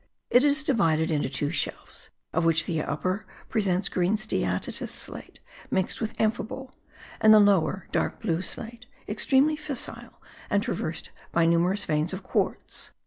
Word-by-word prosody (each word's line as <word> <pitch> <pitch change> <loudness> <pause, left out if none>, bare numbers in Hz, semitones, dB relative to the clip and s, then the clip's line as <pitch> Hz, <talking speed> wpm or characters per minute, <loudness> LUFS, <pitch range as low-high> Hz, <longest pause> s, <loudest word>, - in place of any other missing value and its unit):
It 245 - +6
is 290 +1 +3
divided 165 - +2
into 145 -4 0
two 145 +2 -1
shelves, 155 - -3 0.2
of 165 - +1
which 165 0 +3
the 160 -3 -1
upper 185 +7 -2 0.3
presents 195 -4 +1
green 180 +3 +1
steatitous 215 +1 -2
slate - - -5 0.3
mixed 190 +3 -1
with 220 0 -3
amphibole, 230 +4 -1 0.5
and 215 - +6
the 215 - +9
lower, 195 -2 +3
dark - - 0
blue 175 -6 0
slate, 235 +5 -7 0.2
extremely 285 +3 +3
fissile, 300 -4 -5 0.3
and - - +2
traversed - - -3 0.2
by 170 -1 +3
numerous 170 +4 +2
veins 155 +2 0
of 190 - -5
quartz. - - -1
195 Hz, 145 wpm, -27 LUFS, 165-230 Hz, 0.5 s, the